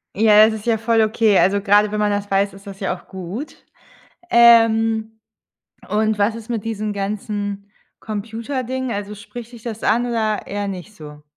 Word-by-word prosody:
Ja, 215 0 +6
das 220 - +1
ist 220 +1 -7
ja 225 - +3
voll 225 +1 +2
okay. 215 -2 +3
Also, 200 +2 +3
gerade 205 +1 +3
wenn 210 - -2
man 210 -1 +1
das 205 0 -2
weiß, 195 +1 +1
ist 195 +1 -15
das 195 -1 -9
ja 190 -2 -2
auch 180 - -17
gut. 190 - -7 0.7
Ähm, 225 -1 +4 0.7
und 215 0 0
was 205 +2 +2
ist 230 0 -9
mit 230 -4 -3
diesen 215 -2 -3
ganzen 205 0 -4 0.3
Computerdingen, 235 +4 -4
also, 205 -1 -4
spricht 230 +3 -10
dich 235 -2 -12
das 225 -2 -6
an 240 +3 +2
oder 220 -3 -1
eher 205 0 -3
nicht 195 +2 -7
so? 150 -5 -12
215 Hz, 180 wpm, -20 LUFS, 200-225 Hz, 0.7 s, Ja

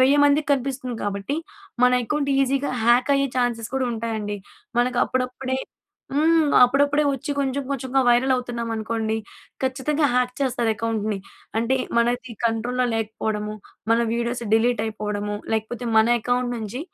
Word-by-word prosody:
1000 275 +3 +5
మందికి 290 +1 +3
కనిపిస్తుంది 255 -2 -2
కాబట్టి, 205 +8 -2 0.5
మన 250 - +5
అకౌంట్ 285 +1 -1
ఈజీగా 275 +1 +1
హ్యాక్ 245 +4 +4
అయ్యే 275 0 +1
ఛాన్సెస్ 235 -3 -1
కూడా 260 -1 +1
ఉంటాయండి. 220 -2 -3 0.4
మనకు 245 0 0
అప్పుడప్పుడే 255 +1 -2 0.6
హ్మ్. 315 +1 +4
అప్పుడప్పుడే 285 +3 +4
వచ్చి 270 +2 -4
కొంచెం 275 0 0
కొంచెంగా 265 0 0
వైరల్ 245 +2 +4
అవుతున్నామనుకోండి, 230 -2 -2 0.5
ఖచ్చితంగా 285 +3 +1
హ్యాక్ 250 0 +2
చేస్తారు 245 -4 +1
అకౌంట్‌ని. 215 -2 -2 0.4
అంటే 235 +4 +1 0.2
మనది 245 +1 +1
కంట్రోల్‌లో 235 +2 0
లేకపోవడము, 215 -1 -2 0.4
మన 230 - +5
వీడియోస్ 235 +1 -2
డిలీట్ 230 0 +3
అయిపోవడము, 210 -1 -3 0.2
లేకపోతే 220 +3 -2
మన 220 +1 +6
అకౌంట్ 245 +2 0
నుంచి 225 +4 -5
245 Hz, 130 wpm, -23 LUFS, 225-265 Hz, 0.6 s, మన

